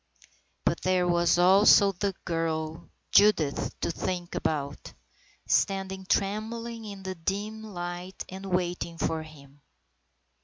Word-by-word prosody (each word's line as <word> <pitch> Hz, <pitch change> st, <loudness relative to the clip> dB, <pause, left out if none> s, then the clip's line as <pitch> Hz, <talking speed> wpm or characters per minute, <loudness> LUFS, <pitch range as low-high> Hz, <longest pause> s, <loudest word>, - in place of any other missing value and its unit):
But -, -, +1 dB
there 185 Hz, -1 st, +2 dB
was 170 Hz, -1 st, +3 dB
also 195 Hz, +2 st, +6 dB
the 195 Hz, +1 st, -2 dB
girl 160 Hz, -2 st, -2 dB, 0.2 s
Judith 185 Hz, -9 st, +3 dB
to -, -, 0 dB
think 175 Hz, 0 st, -4 dB
about, 145 Hz, -2 st, -3 dB, 0.5 s
standing 190 Hz, -1 st, 0 dB
trembling 225 Hz, +3 st, -1 dB
in 200 Hz, -2 st, -8 dB
the 190 Hz, 0 st, -3 dB
dim 200 Hz, +5 st, -3 dB
light 180 Hz, -2 st, -6 dB
and 190 Hz, +1 st, -8 dB
waiting 175 Hz, -2 st, -2 dB
for 160 Hz, -1 st, -1 dB
him. 145 Hz, -2 st, -14 dB
185 Hz, 115 wpm, -28 LUFS, 165-195 Hz, 0.5 s, also